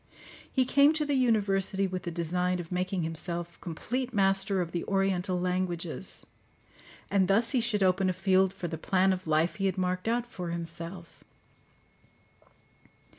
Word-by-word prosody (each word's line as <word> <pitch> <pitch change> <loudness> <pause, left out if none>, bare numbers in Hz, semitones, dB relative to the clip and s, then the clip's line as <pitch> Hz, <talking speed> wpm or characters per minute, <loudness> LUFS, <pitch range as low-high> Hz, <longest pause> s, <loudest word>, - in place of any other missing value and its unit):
He 260 -2 +2
came 280 +4 +5
to 310 -1 +1
the 290 - 0
university 200 -6 +2
with 185 -1 -3
the 175 - -4
design 180 +2 -1
of 170 0 -7
making 180 0 -1
himself 170 +1 -4
complete 245 +9 -3
master 195 0 +2
of 170 -2 -2
the 170 - -2
oriental 190 -2 0
languages, 180 -1 -2 0.9
and 195 -2 +3
thus 220 +5 +3
he 255 -4 +2
should 210 -3 +1
open 185 0 +3
a - - +1
field 190 0 +3
for 190 -2 -5
the 160 -1 -5
plan 190 +2 +2
of 185 -2 -6
life 160 +2 +1
he 195 -1 +1
had 190 0 -2
marked 185 +1 -1
out 235 +1 +1
for 180 -8 -6
himself. 170 +1 -6
185 Hz, 160 wpm, -29 LUFS, 175-195 Hz, 0.9 s, came